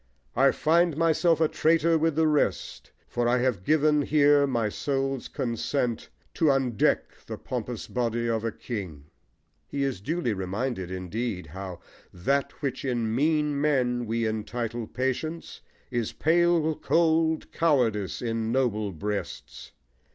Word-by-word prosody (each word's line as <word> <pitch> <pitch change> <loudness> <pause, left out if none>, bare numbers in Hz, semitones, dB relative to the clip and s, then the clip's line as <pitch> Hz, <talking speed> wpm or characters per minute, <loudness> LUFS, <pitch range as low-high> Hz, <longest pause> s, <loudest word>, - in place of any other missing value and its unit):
I 135 +2 +5
find 165 +2 +2
myself 165 0 +3
a 160 - +4
traitor 165 +1 +2
with 160 -1 +1
the 160 0 +3
rest, 150 -2 0 0.2
For 120 0 -1
I 120 +1 +3
have 125 -7 0
given 150 +3 +3
here 145 -1 +4
my 120 -5 0
soul's 135 +3 -2
consent 120 0 -2 0.2
To 165 - 0
undeck 135 -6 +1
the - - -5
pompous - - -5
body 120 -1 -1
of 115 -1 0
a 115 - -1
king. 85 - -7 0.6
He 140 -1 -2
is 135 -9 -2
duly 155 -1 -1
reminded, 95 +1 -3
indeed, 95 +2 -4
how 90 +3 -8 0.3
That 140 - -1
which 130 -2 -2
in 120 -4 -1
mean 150 +1 +1
men 125 -5 +1
we 115 +1 0
entitle 115 +1 -3
patience 130 +6 -3 0.3
Is 120 -3 -2
pale 165 -1 +2
cold 160 -1 +1
cowardice 120 - +1
in 115 -1 -1
noble 110 -6 0
breasts. 105 +5 -5
130 Hz, 135 wpm, -27 LUFS, 110-150 Hz, 0.6 s, I